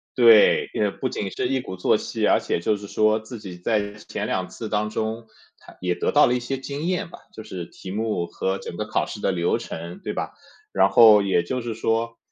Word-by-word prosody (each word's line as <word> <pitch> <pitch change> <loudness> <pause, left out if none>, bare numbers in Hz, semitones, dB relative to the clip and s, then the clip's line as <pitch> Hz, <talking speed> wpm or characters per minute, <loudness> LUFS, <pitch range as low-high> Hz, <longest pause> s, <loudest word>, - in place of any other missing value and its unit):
对， 475 -1 +6
也 105 - +1
不 130 - -3
仅 100 - -3
是 - - -2
一 135 0 +1
鼓 95 - -7
作 90 - +3
气， - - -2
而 - - +4
且 - - -1
就 105 - +1
是 100 0 -9
说 110 +2 +2
自 110 +1 -9
己 95 -4 -9
在 100 +2 -1
前 105 0 -6
两 95 -1 -1
次 115 - -7
当 105 0 0
中 110 +1 -3 0.3
他 - - -17
也 90 -1 0
得 - - -1
到 150 - +6
了 120 - +2
一 125 - +1
些 135 +3 -3
经 140 +2 -6
验 180 -1 -1
吧， - - -12
就 110 - -9
是 90 -4 -6
题 95 - -10
目 105 -3 -1
和 95 +2 -2
整 85 - -8
个 105 - -2
考 - - 0
试 105 - -8
的 - - +1
流 85 -2 +1
程， 85 +2 -7
对 - - -3
吧？ - - -4 0.4
然 95 0 +4
后 110 -3 +8
也 95 -3 +1
就 125 +9 -3
是 115 -1 -4
说 115 +1 -1
110 Hz, 255 characters per minute, -23 LUFS, 95-120 Hz, 0.4 s, 后